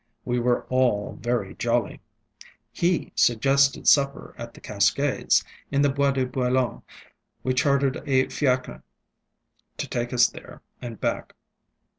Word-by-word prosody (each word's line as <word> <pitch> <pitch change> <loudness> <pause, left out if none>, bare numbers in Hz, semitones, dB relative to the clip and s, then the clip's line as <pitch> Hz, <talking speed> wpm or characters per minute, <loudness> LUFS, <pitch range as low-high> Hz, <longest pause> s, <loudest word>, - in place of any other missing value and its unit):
We 125 0 0
were 120 0 +1
all 125 -5 0
very 120 -5 -2
jolly. 120 -2 -1 0.7
He 175 -1 0
suggested 135 +3 +2
supper 140 -1 +3
at 115 0 -9
the - - -13
Cascades, 110 +7 +1 0.3
in 140 0 +1
the 145 - +4
Bois 140 0 +1
de 130 -1 0
Boulogne. 125 0 -1 0.6
We 130 - 0
chartered 140 0 +1
a 130 -1 +3
fiacre 130 -3 -1 1.0
to - - -4
take 120 0 -3
us 120 -1 +5
there - - -13 0.2
and 120 -4 -7
back. - - -3
130 Hz, 130 wpm, -25 LUFS, 120-140 Hz, 1.0 s, us